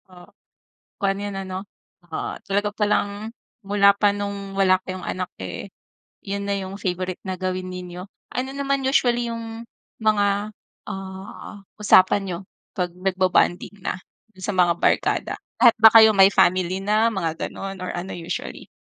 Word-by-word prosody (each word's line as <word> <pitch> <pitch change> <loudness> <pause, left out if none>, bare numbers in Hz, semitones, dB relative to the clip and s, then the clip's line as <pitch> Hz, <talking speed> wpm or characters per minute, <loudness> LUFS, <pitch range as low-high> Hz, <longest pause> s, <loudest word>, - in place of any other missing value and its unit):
Ah. 180 -1 -15 0.7
Kuwan, 195 -1 +1
yun 205 0 -4
ano, 190 0 -5 0.5
ah, - - -3
talaga 205 +1 0
palang 210 +1 0 0.3
mula 200 0 +4
pa 205 0 +3
nung 200 -1 -5
wala 190 -1 +4
kayong 185 -1 -6
anak, 185 -1 -4
eh, - - -6 0.5
yun 200 0 -3
na 200 - +1
yung 195 +1 -6
favourite 185 0 -3
na 190 -1 -3
gawin 185 0 -3
ninyo. 180 0 -7 0.3
Ano 260 +1 -2
naman 275 0 0
usually 240 -3 +2
yung 230 0 -6 0.3
mga, 205 -1 +2 0.4
ah, 190 +1 -8 0.2
usapan 205 -2 +5
niyo 180 -3 -4 0.3
'pag 180 -1 -1
nagbobonding 185 +1 +1
na - - -2 0.3
dun 190 - -17
sa 205 - -2
mga 175 -1 +5
barkada? - - +1 0.2
Lahat 240 -2 +7
ba 220 0 +8
kayo 220 -2 +8
may 195 0 +7
family 185 0 +2
na, 215 +3 +2
mga 165 -5 -2
gano'n 195 0 -7
or - - -4
ano 175 +2 -5
usually? 170 0 -6
195 Hz, 150 wpm, -23 LUFS, 185-210 Hz, 0.7 s, ba